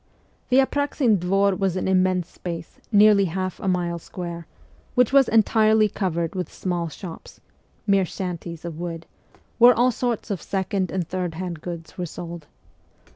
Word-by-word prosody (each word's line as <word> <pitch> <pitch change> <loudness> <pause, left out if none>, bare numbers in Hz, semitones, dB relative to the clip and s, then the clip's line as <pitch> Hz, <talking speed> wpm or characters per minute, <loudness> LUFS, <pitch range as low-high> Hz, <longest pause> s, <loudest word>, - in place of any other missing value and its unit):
The 255 - +4
Apraxin 270 -5 +2
Dvor 195 +2 +2
was 190 -2 +1
an 185 - -1
immense 185 -2 +2
space, 170 -2 -7
nearly 205 -1 +6
half 185 +1 -3
a - - -4
mile 175 -2 0
square, 170 -2 -7 0.5
which 250 +1 +3
was 275 -3 +6
entirely 220 0 +4
covered 170 -5 -2
w 185 -2 -2
T - - -16
ith - - -23
small 175 -3 -2
shops 165 +2 -10 0.5
mere 195 -2 +3
shanties 170 -2 -6
of 165 -2 -6
wood 165 -1 -5 0.5
where 240 0 +8
all 245 +2 +3
sorts 235 -2 -2
of 190 -6 -2
second 190 -1 -1
and 180 -4 -2
third 180 -2 -3
hand 175 -2 -5
goods 170 0 -8
were 175 - -2
sold. 170 -2 -8
185 Hz, 165 wpm, -24 LUFS, 170-205 Hz, 0.5 s, where